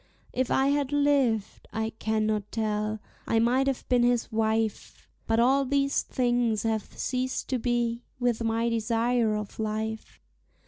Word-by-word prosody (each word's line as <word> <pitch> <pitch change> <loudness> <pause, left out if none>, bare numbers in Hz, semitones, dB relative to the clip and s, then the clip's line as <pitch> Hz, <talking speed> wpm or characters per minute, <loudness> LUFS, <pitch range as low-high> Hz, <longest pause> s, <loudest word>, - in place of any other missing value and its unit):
If 255 0 0
I 270 +1 +3
had 285 -1 0
lived 280 -7 +1
I 220 0 -2
cannot 215 -1 0
tell 215 -1 -1 0.3
I 225 - +2
might 250 +4 +3
have 270 -2 -2
been 250 -1 +3
his 240 0 +1
wife; 220 -1 -1 0.2
But 225 0 +2
all 265 +4 +4
these 275 +1 +1
things 240 -4 0
have 220 -2 -2
ceased 255 0 -2
to 255 - 0
be, 240 0 0 0.2
with 240 -2 0
my 225 +1 +1
desire 230 0 +1
of 210 0 -6
life. 220 0 -3
230 Hz, 145 wpm, -27 LUFS, 220-255 Hz, 0.3 s, all